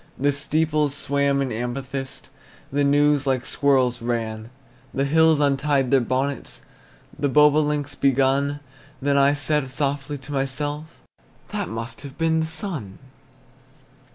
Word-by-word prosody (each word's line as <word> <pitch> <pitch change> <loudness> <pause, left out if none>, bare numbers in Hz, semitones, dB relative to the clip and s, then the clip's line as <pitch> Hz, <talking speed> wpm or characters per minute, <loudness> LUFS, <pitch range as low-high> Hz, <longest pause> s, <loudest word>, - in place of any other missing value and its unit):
The 145 +2 +2
steeples 150 0 0
swam 140 -1 +1
in 130 - -3
amethyst, 130 +3 -5 0.4
The 145 +1 +1
news 145 0 +3
like 130 -1 0
squirrels 130 -4 +2
ran. 115 -2 -3 0.5
The 135 - +1
hills 160 +1 +4
untied 140 -2 +1
their 135 -2 +5
bonnets, 130 +2 -3 0.5
The 145 - +1
bobolinks 150 0 +3
begun. 140 +2 +1 0.4
Then 140 +1 +1
I 140 +1 +4
said 145 -1 0
softly 140 +1 -2
to 135 +1 -11
myself, 145 +2 -2 0.6
"That - - -3
must 115 +2 -5
have 140 -1 -10
been 160 0 +2
the 160 - -1
sun!" 155 - -4
140 Hz, 125 wpm, -23 LUFS, 130-145 Hz, 0.6 s, their